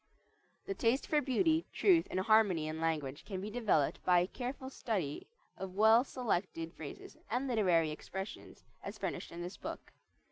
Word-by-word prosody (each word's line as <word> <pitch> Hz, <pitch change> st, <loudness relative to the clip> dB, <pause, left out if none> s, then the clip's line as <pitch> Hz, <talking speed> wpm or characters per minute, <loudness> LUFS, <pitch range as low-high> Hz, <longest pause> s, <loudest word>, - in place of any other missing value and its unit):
The 395 Hz, -, -2 dB
taste 260 Hz, -6 st, +1 dB
for 300 Hz, -1 st, +2 dB
beauty, 320 Hz, +4 st, +2 dB
truth, 350 Hz, -5 st, +4 dB
and 185 Hz, -, -1 dB
harmony 195 Hz, -7 st, +4 dB
in 155 Hz, +1 st, -4 dB
language 150 Hz, -4 st, -1 dB
can 195 Hz, -3 st, -5 dB
be 205 Hz, +3 st, -5 dB
developed 210 Hz, -, +1 dB
by 180 Hz, -1 st, +4 dB
careful 260 Hz, +5 st, -5 dB
study 190 Hz, -, -3 dB, 0.3 s
of 190 Hz, -1 st, -6 dB
well 220 Hz, +3 st, +6 dB
selected 185 Hz, -10 st, -2 dB
phrases 150 Hz, -3 st, -9 dB
and 250 Hz, +5 st, -1 dB
literary 180 Hz, -10 st, +3 dB
expressions 190 Hz, +6 st, -7 dB, 0.2 s
as -, -, -6 dB
furnished -, -, -4 dB
in 170 Hz, +1 st, -6 dB
this 180 Hz, +2 st, -7 dB
book. -, -, -7 dB
205 Hz, 155 wpm, -34 LUFS, 165-250 Hz, 0.3 s, well